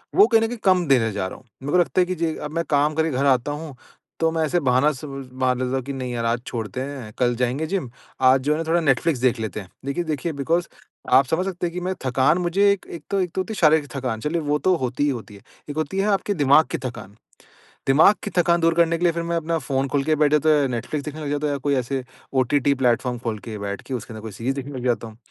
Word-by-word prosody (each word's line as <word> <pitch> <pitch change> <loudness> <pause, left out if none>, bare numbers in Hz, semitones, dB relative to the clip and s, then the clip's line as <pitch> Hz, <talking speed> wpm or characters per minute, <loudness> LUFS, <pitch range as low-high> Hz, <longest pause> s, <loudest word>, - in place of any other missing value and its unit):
वो 205 - +7
कहीं 225 -2 +4
न 225 - +2
कहीं 240 +1 -5
कम 185 -3 +4
देने 120 -5 +3
जा 95 -2 -2
रहा - - -8
हूँ। - - -20 0.2
मेरे 145 - -3
को 180 - +5
लगता 175 +1 +1
है - - +3
कि 185 - -2
जे 165 -2 -1
अब 150 - -5
मैं 165 0 0
काम 150 +1 +2
करके 160 0 +1
घर 135 +1 0
आता 130 0 +2
हूँ, 150 -1 -6 0.4
तो 165 0 +2
मैं 160 0 0
ऐसे 175 +3 +1
बहाना 130 0 +3
स 135 +2 -9 0.3
मार 130 0 +1
लेता 130 +1 -1
हूँ 135 - 0
कि 140 - -4
नहीं 130 -2 -4
यार 115 -1 -2
आज 115 +1 0
छोड़ते 115 +1 -4
हैं, 130 -6 -6
कल 120 -1 +3
जाएँगे 125 +5 -1
जिम, 180 -7 -2 0.3
आज 130 0 +5
जो 145 +3 0
है - - -1
ना - - -1
थोड़ा 170 +1 +3
नेटफ्लिक्स 145 0 +2
देख 125 -2 +2
लेते 110 -2 -4
हैं। 95 - -13 0.2
देखिए 140 +5 -1
देखिए 155 +1 -2
बिकॉज़ 165 +5 0 0.5
आप 135 - +7
समझ 165 +7 0
सकते 180 -2 -2
हैं 170 - -7
कि 180 - -3
मैं 185 +1 -1
थकान 130 +5 +3
मुझे 190 +3 +3
एक 200 - -8
एक 165 - -8
तो 200 - +1
एक 180 -2 -2
तो 190 - +1
होती 220 +4 -5
है - - -6
शारीरिक 155 -2 +4
थकान 125 -5 -2
चलिए 165 +5 -1
वो 150 0 0
तो 185 +2 +3
होती 130 0 -2
ही 145 - +3
होती 115 -6 -5
है। 100 - -14 0.3
एक 145 - -5
होती 155 +5 -2
है 195 - +1
आपके 200 0 +1
दिमाग़ 145 -2 +5
की - - -1
थकान, 110 -5 -7 0.7
दिमाग़ 150 +9 +6
की 205 - -3
थकान 170 0 +3
दूर 165 0 +3
करने 170 0 +3
के 175 - -2
लिए 175 - +4
फिर 170 0 -3
मैं 170 0 -1
अपना 165 0 -1
फ़ोन 135 -3 -1
खोल 140 0 0
के 155 +1 +2
बैठ 150 -1 +3
जाता 150 +1 +3
हूँ 150 - +5
या 140 - +2
नेटफ्लिक्स 130 +4 -3
देखने 155 +1 -6
लग 145 - -3
जाता 145 +1 -1
हूँ 145 - 0
या - - -3
कोई 140 +1 0
ऐसे 130 +1 -2 0.3
ओटीटी 135 +2 +2
प्लेटफ़ॉर्म 125 -1 +1
खोल 110 -2 -2
के 110 -1 -5
बैठ 100 -1 -5
के 135 - -6
उसके 120 -1 -6
अंदर 110 - -8
कोई 110 -1 -7
सीरीज़ 120 +7 -2
देखने 140 +1 -5
लग 125 - -6
जाता 120 -2 0
हूँ। 110 - -14
145 Hz, 285 wpm, -23 LUFS, 125-165 Hz, 0.7 s, वो